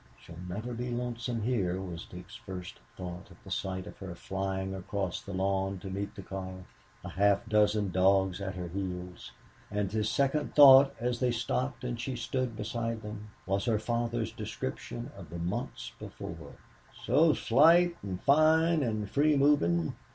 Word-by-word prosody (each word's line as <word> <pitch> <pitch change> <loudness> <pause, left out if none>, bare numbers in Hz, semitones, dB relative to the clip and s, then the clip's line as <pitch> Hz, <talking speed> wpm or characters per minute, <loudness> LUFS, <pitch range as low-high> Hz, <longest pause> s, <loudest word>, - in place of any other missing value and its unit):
"She'll 85 0 -12
never 110 +7 -4
be 120 +2 -4
lonesome 120 -1 -3
here," 95 -7 0
was 90 -3 -6
Dick's 90 0 -11
first 95 -6 -8 0.2
thought 90 -1 -7
at - - -18
the - - -11
sight 95 -1 -3
of - - -11
her 95 -3 -7
flying 95 +1 -3
across 95 -1 -3
the 100 - -9
lawn 95 0 0
to 95 +1 -7
meet 100 +1 -4
the 100 - -8
car, 95 -1 -7 0.4
a - - -6
half 100 +3 +2
dozen 105 -2 +2
dogs 95 +1 +3
at 95 -1 -4
her 90 -1 -4
heels. 90 -1 -5 0.4
And 105 -2 -1
his 110 0 0
second 140 +1 0
thought, 135 -1 +9
as 120 0 -1
they 125 - +2
stopped 125 +1 -2
and 120 -2 -3
she 130 +1 -3
stood 125 0 -2
beside 115 +1 -3
them, 105 0 -7 0.2
was 100 +1 0
her 115 -3 +2
father's 115 0 -1
description 120 +2 -5
of 90 -6 -11
the 85 - -6
months 100 +10 -4
before - - -8 0.5
"so 160 0 +5
slight 170 +8 +5
and 95 -3 -5
fine 160 +3 +4
and 110 -5 -1
free 145 +7 +3
moving." 85 - +3
105 Hz, 165 wpm, -30 LUFS, 95-125 Hz, 0.5 s, thought